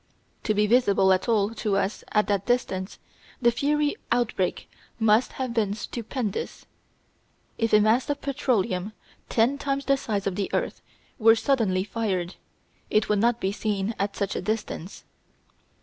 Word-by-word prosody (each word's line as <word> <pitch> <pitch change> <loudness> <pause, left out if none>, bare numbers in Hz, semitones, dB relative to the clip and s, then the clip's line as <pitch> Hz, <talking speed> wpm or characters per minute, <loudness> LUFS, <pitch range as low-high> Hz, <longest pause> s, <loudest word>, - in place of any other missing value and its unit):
To 215 - +1
be 210 +1 +3
visible 200 -4 +4
at 185 +5 -1
all 210 -2 +2
to 210 -3 -1
us 195 +1 -2
at 210 0 +3
that 200 -1 -1
distance 195 -6 -1 0.4
the 240 -1 +4
fiery 290 +4 +1 0.2
outbreak 230 -6 0 0.3
must 220 +2 +3
have 255 -3 -3
been 210 -3 0
stupendous. 225 -1 -4 0.9
If 225 -1 +1
a 210 - +7
mass 220 +6 +2
of 285 - -1
petroleum 215 -8 -1 0.4
ten 245 +5 +2
times 275 -1 -2
the 275 0 +3
size 205 -6 -3
of 195 - 0
the 200 - -1
earth - - -2 0.4
were 225 0 +7
suddenly 225 -7 +1
fired 195 -4 -2 0.6
it 215 0 +2
would 210 -1 +2
not 235 +2 +2
be 190 - 0
seen 205 0 -2
at 200 +1 -1
such 200 - -2
a - - -2
distance. 210 -3 -4
215 Hz, 155 wpm, -26 LUFS, 200-240 Hz, 0.9 s, a